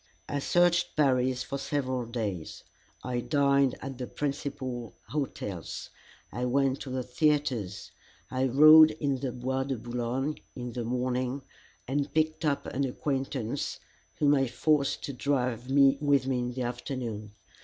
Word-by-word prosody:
I 145 - -2
searched 175 +3 +2
Paris 130 -3 +2
for 140 - -4
several 130 -4 -2
days. 105 -8 -4 0.4
I 125 -1 -2
dined 140 0 +2
at 135 -1 -6
the 125 - -4
principal 130 -6 -4
hotels; 105 - -4 0.4
I 125 +1 -2
went 135 +1 +1
to 135 - -7
the 130 0 -2
theatres; 125 - 0 0.4
I 130 +1 +1
rode 155 +4 +9
in 140 -3 0
the 130 -1 -2
Bois 130 +2 -2
de 135 -2 -2
Boulogne 120 +5 -2 0.2
in 125 -1 -5
the 120 -1 -3
morning, 125 +2 -1 0.4
and 140 +2 -1
picked 155 +1 +1
up 145 -2 0
an 140 - -2
acquaintance, 135 -3 -2 0.4
whom 145 -1 +3
I 135 -2 +3
forced 140 +3 +1
to 140 - -4
drive 125 -2 -1
with 140 0 +4
me 130 -2 0
in 125 0 -2
the 130 0 -3
afternoon. 120 -4 -4
130 Hz, 145 wpm, -29 LUFS, 125-140 Hz, 0.4 s, rode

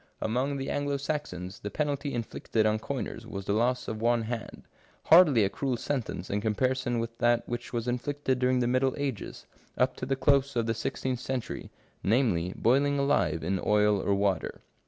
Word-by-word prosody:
Among 130 +5 -1
the 135 - -3
Anglo 145 0 -1
Saxons 135 - -4
the 105 - -5
penalty 145 +4 -2
inflicted 115 -2 -1
on 110 0 +2
coiners 120 -2 -5
was 100 -3 -6
the 100 - 0
loss 125 +4 +1
of 110 0 -4
one 120 0 +2
hand; 115 0 -5 0.4
hardly 155 - +7
a 95 - +2
cruel 130 +2 -1
sentence 115 -9 -3
in 100 +1 0
comparison 120 +3 0
with 115 0 -3
that 120 0 +2
which 120 0 -5
was 120 -1 -2
inflicted 130 +1 -1
during 125 0 +2
the 120 - +1
middle 130 +1 +2
ages, 135 -7 -4 0.3
up 130 +1 +2
to 125 - -5
the 135 - +1
close 140 0 +2
of 115 -1 +1
the 115 - 0
sixteenth 125 +2 -3
century, 130 -1 -4 0.3
namely, 100 -6 +2
boiling 140 +4 +2
alive 85 - +1
in 95 +3 -1
oil 105 -1 +3
or 100 - +1
water. 100 -1 -1
120 Hz, 180 wpm, -28 LUFS, 110-135 Hz, 0.4 s, hardly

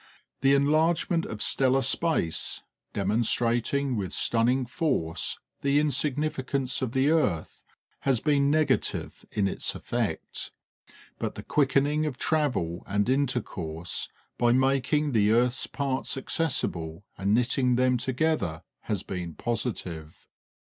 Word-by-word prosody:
The 135 +1 +5
enlargement 160 +4 +2
of 105 -1 -2
stellar 135 0 +2
space, 160 - 0 0.3
demonstrating 120 +6 +1
with 100 -4 -3
stunning 125 +3 +2
force 115 - -1 0.2
the 140 +1 +2
insignificance 140 -2 0
of 130 -2 -2
the 135 +3 +3
earth, 120 - 0 0.4
has 135 -4 +1
been 140 -1 +2
negative 150 -3 0
in 100 -2 +1
its - - -2
effect; - - -3 0.7
but - - -3
the - - -7
quickening 145 +2 +2
of 135 -4 -4
travel 130 - 0
and 105 +2 +1
intercourse, 120 - -1 0.3
by 120 -1 +4
making 135 +3 +2
the 105 -4 +3
earth's 120 +2 +2
parts 135 -1 -2
accessible 100 - -1
and 100 +2 +1
knitting 125 +1 +2
them 125 0 +3
together, 130 - -1 0.2
has 105 -4 -2
been 90 -4 -5
positive. 90 -10 -3
130 Hz, 115 wpm, -27 LUFS, 105-140 Hz, 0.7 s, The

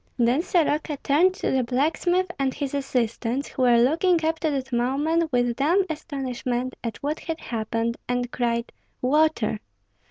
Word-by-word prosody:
Then 245 +4 +3
Soroka 310 -4 0
turned 350 +7 +3
to - - -2
the 265 -1 +2
blacksmith 320 +9 +1
and 265 -1 0
his 280 -2 -3
assistants, 250 -1 -1
who - - -5
were 245 -2 +5
looking 325 +7 +3
up 320 0 0
to 320 - 0
that 270 -3 -3
moment 295 +7 +1
with 245 -1 +1
dumb 345 +9 +3
astonishment 255 -4 -3
at 230 -2 -4
what 300 +2 -1
had 325 -1 -5
happened, 230 0 -2
and 245 0 -1
cried, 235 -1 -1 0.3
"Water!" 265 -5 +2
270 Hz, 155 wpm, -24 LUFS, 245-315 Hz, 0.3 s, were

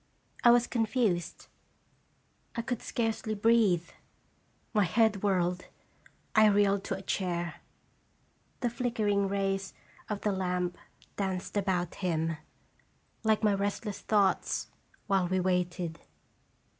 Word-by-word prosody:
1 240 - +8
was 240 0 +5
confused. 225 -6 0 1.1
I 235 - -2
could 245 -1 -3
scarcely 225 -2 -2
breathe. 210 -5 +3 0.9
My 210 -2 +4
head 210 +2 +2
whirled. 180 -3 0 0.7
I 215 -1 +7
reeled 200 -1 +3
to 195 - -2
a 195 - -10
chair. 175 -3 -2 1.0
The 240 -2 0
flickering 215 -5 0
rays 195 -1 -1 0.3
of 210 -2 -3
the 210 - +1
lamp 180 -2 -1 0.4
danced 190 -1 -3
about 185 -4 0
him, 165 -3 0 0.9
like 220 0 +2
my 210 -1 +4
restless 200 +1 -2
thoughts, 200 -3 +1 0.3
while 195 -3 +2
we 185 +1 +1
waited. 180 -2 -1
200 Hz, 110 wpm, -30 LUFS, 180-215 Hz, 1.1 s, 1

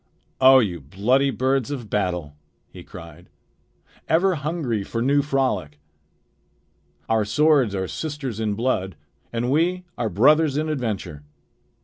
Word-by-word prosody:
"O 130 0 +8
you 100 -9 +1
bloody 110 - +1
birds 130 +1 0
of 130 -6 -5
battle!" 90 -8 -2 0.4
he - - -11
cried. 85 +1 -12 0.8
"Ever 185 +4 +3
hungry 150 - -2
for 115 - -4
new 140 +4 +2
frolic! 130 - -1 1.3
Our 110 -1 +2
swords 135 0 +2
are 95 -1 -2
sisters 145 - -5
in 105 -2 -1
blood, 100 -6 -1 0.4
and 120 +2 -2
we 175 +5 +1 0.2
are 115 - 0
brothers 145 - +3
in 155 +1 -1
adventure. 105 - -4
125 Hz, 125 wpm, -23 LUFS, 100-145 Hz, 1.3 s, O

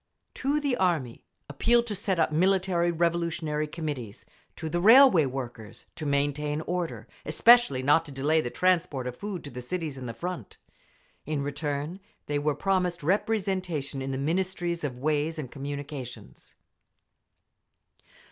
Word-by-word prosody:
To 280 +3 0
the 285 -4 0
Army, 160 -11 0 0.2
appeal 235 +12 +2
to 230 -3 -4
set 195 -2 0
up 160 - +2
Military 180 +1 +2
Revolutionary 170 -2 0
Committees. 145 -9 -6 0.3
To 160 - -5
the 175 +2 -1
railway 220 - +7
workers, 120 -5 -7
to 155 - -5
maintain 145 +1 0
order, 160 - -3 0.2
especially 160 - +5
not 150 +4 +4
to 145 - -10
delay 145 +4 +2
the 120 - -3
transport 175 -5 +1
of 125 -1 -4
food 200 +3 -5
to 145 - -8
the 125 +1 -7
cities 150 0 -4
and 125 -2 -6
the 115 - -6
front…. 175 - -6 0.7
In 150 -2 -1
return, 145 +4 -3 0.3
they 145 0 -1
were 145 0 0
promised 180 -1 0
representation 185 -7 -1
in 135 - -4
the 135 - -2
Ministry 175 +4 -1
of 145 -7 -5
Ways 150 +3 0
and 135 -6 -6
Communications. 140 -2 -7
155 Hz, 145 wpm, -27 LUFS, 140-180 Hz, 0.7 s, railway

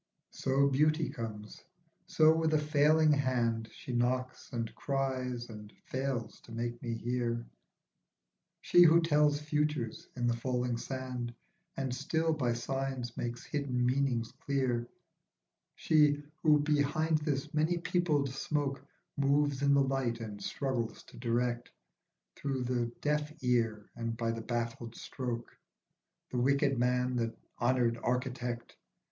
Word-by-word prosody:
SO 135 +1 +2
beauty 155 +3 +2
comes, 105 -2 -7 0.4
so 155 0 +5
with 160 -1 +2
a - - +6
failing 150 +1 +4
hand 120 -5 +1
She 125 - -7
knocks, 125 +1 -1
and 115 -3 -3
cries, 130 -3 -2
and 105 -2 -10
fails 130 -4 -3
to - - -15
make 120 +1 -3
me 115 -1 -2
hear, 120 0 -1 1.2
She 175 - +5
who 170 -1 +8
tells 150 -2 +3
futures 150 -5 -1
in 120 -1 -1
the 120 -1 +2
falling 125 0 -1
sand, 125 -2 -4 0.4
And 135 -2 -1
still, 160 +5 0
by 125 -6 0
signs, 130 0 -3
makes 120 0 -4
hidden 130 -4 -1
meanings 125 -3 +1
clear; 125 -4 0 0.9
She, 150 -2 +3 0.2
who 150 -2 +5
behind 150 +2 +2
this 145 -3 -2
many 155 +3 +2
peopled 160 -6 +1
smoke, 140 -1 -2 0.3
Moves 140 0 +2
in 140 0 +4
the 140 - +5
light 130 -4 0
and 105 -3 -7
struggles 130 -5 -2
to - - -15
direct, 120 0 -1 0.7
Through 135 -2 -2
the 120 -1 0
deaf 150 0 0
ear 115 -4 +1
and 115 -1 -3
by 115 -1 0
the 115 0 -4
baffled 115 0 -3
stroke, 120 -3 -5 0.8
The 125 - 0
wicked 140 +1 +2
man, 125 0 +1
the 115 -1 -1 0.3
honoured 120 -1 +2
architect. 125 -1 -2
130 Hz, 130 wpm, -32 LUFS, 120-145 Hz, 1.2 s, who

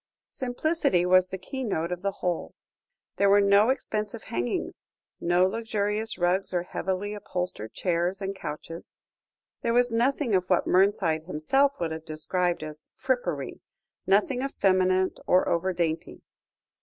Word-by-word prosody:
Simplicity 260 - 0
was 185 0 +5
the 190 - -5
keynote 190 - -3
of 180 0 -3
the 200 +1 0
whole. 180 -3 -3 0.6
There 200 0 +4
were 200 +1 +6
no 200 +3 +5
expensive 215 -4 -2
hangings, 120 +1 -3 0.4
no 175 +1 +3
luxurious 215 +1 -1
rugs 180 +1 +1
or 175 - +1
heavily 190 +3 -3
upholstered 180 - -4
chairs 180 +1 0
and 195 0 -3
couches; 165 0 -6 0.6
there 235 0 0
was 245 0 +3
nothing 245 +1 +1
of 185 -1 +2
what 180 - +3
Mernside 180 -4 +2
himself 270 - +1
would 165 -2 -1
have 160 0 -5
described 170 +2 -1
as 155 0 -8
"frippery," 180 - -2 0.5
nothing 210 +7 +3
effeminate 185 -7 +2
or 180 - +4
over 180 +3 +1
dainty. 170 -2 -3
185 Hz, 135 wpm, -27 LUFS, 175-215 Hz, 0.6 s, were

